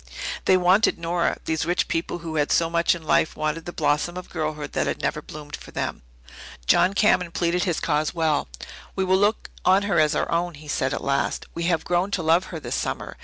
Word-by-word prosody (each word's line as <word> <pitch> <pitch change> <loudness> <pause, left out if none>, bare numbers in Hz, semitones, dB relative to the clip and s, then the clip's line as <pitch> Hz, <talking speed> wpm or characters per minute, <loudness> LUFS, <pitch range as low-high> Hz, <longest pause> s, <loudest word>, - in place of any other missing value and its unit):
They 185 - +5
wanted 185 +4 +4
Nora 170 +1 0
these 160 0 0
rich 175 +2 0
people 165 +1 -2
who 160 -1 -4
had 145 -1 +1
so 165 -1 +2
much 170 +1 +3
in 170 - -9
life 155 - +2
wanted 155 +2 -2
the 175 - -5
blossom 155 +2 0
of 180 - -8
girlhood 155 -3 -3
that - - 0
had - - -2
never - - -1
bloomed 150 -1 -8
for - - -12
them. - - -3 0.6
John 185 - +4
Cameron 185 -4 +3
pleaded 175 +2 0
his 175 -4 0
cause 150 +1 0
well. 160 - 0 0.5
"We 190 - 0
will 190 0 +3
look 205 +2 +1
on 190 +2 +4
her 200 -5 +2
as 155 0 +3
our - - -1
own," 170 0 0
he 150 +1 -13
said 130 -2 0
at - - -3
last. 140 0 0
"We 170 - -3
have 170 -2 +1
grown 175 +2 +1
to 175 - -4
love 165 +4 +3
her 165 - -6
this - - -5
summer. - - -3
170 Hz, 220 wpm, -24 LUFS, 155-180 Hz, 0.6 s, They